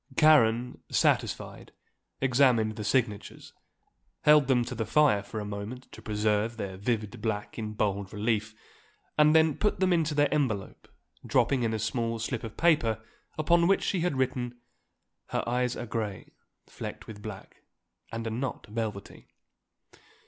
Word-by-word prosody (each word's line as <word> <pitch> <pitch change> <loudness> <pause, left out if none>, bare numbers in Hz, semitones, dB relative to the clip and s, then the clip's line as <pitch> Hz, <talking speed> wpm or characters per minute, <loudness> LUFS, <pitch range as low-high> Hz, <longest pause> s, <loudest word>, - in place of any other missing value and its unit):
Karen, 125 -6 +4
satisfied, - - 0 0.5
examined 125 -5 +3
the 105 - -5
signatures, 105 -3 -2 0.7
held 150 -2 +6
them 125 -3 +3
to 125 - -5
the 115 -1 -2
fire 145 -9 +4
for 110 +2 -6
a 105 - -4
moment 105 +5 -6
to - - -11
preserve 105 +1 0
their 100 -3 -4
vivid 110 +2 -2
black 110 0 -3
in 110 -1 -4
bold 100 -2 -1
relief, 110 0 -1 0.6
and 150 +1 +5
then 160 -2 +5
put 210 - 0
them 185 -1 +3
into 160 -3 +1
their 145 0 +3
envelope, 125 -10 -2 0.4
dropping 125 +1 +2
in 115 -2 +1
a 110 - -1
small 115 +1 -1
slip 115 +1 -3
of 110 -1 -8
paper 150 -10 +3 0.4
upon 170 +2 +3
which 195 - +3
she 190 - 0
had 170 -5 0
written: 125 -2 -1 0.7
"Her - - -2
eyes 125 0 0
are - - -4
grey, 110 -4 -4 0.3
flecked - - -8
with 105 -2 -10
black, 105 -3 -9 0.5
and 115 0 -4
are 115 - -2
not 125 +2 -4
velvety." 105 -2 -5
115 Hz, 150 wpm, -28 LUFS, 105-135 Hz, 0.7 s, held